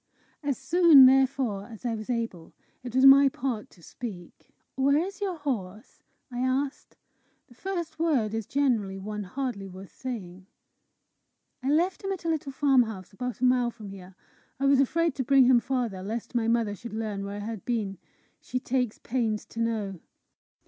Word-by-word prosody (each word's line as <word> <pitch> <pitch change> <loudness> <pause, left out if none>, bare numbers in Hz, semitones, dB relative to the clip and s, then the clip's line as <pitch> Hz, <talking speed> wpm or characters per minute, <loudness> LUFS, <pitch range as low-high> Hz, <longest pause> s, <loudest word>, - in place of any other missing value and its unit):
As 285 -3 -1
soon, 315 -1 +7
therefore, 260 -6 +2
as 230 +1 -12
I 235 - 0
was 215 0 -6
able, 230 -9 -3 0.3
it 245 -1 -7
was 260 +1 +5
my 275 +1 +9
part 250 -4 -4
to 170 - -21
speak. 185 -7 -9 0.2
"Where 275 +2 +3
is 390 +6 -3
your 385 -3 -1
horse?" 220 -7 -5 0.3
I 245 - -5
asked. 265 +2 -2 0.5
The - - -19
first 340 +1 -5
word 270 -11 +1
is 225 -2 -3
generally 235 -9 0
one 210 +2 -5
hardly 240 -2 -4
worth 190 +1 -11
saying. 190 -8 -7 1.1
"I 260 - -2
left 345 +7 +1
him 390 - -2
at 370 -3 -5
a - - 0
little 300 -3 -2
farmhouse, 245 -9 +1
about 250 +3 -5
a - - +4
mile 250 -1 +3
from 215 -3 -10
here. 190 -1 -11 0.4
I 275 - 0
was 275 -1 +5
afraid 330 +4 +2
to 265 - 0
bring 270 +1 +5
him 250 -1 +6
farther, 235 -6 -2
lest 225 +5 -5
my 235 -2 +1
mother 230 -3 +1
should 230 +2 -9
learn 215 -3 -3
where 200 0 -5
I 205 0 -5
had 220 -3 -6
been. 210 -6 -2 0.4
She 255 - -4
takes 250 -3 -1
pains 225 -4 -2
to 230 - -9
know." 215 -5 -2
245 Hz, 175 wpm, -27 LUFS, 210-275 Hz, 1.1 s, my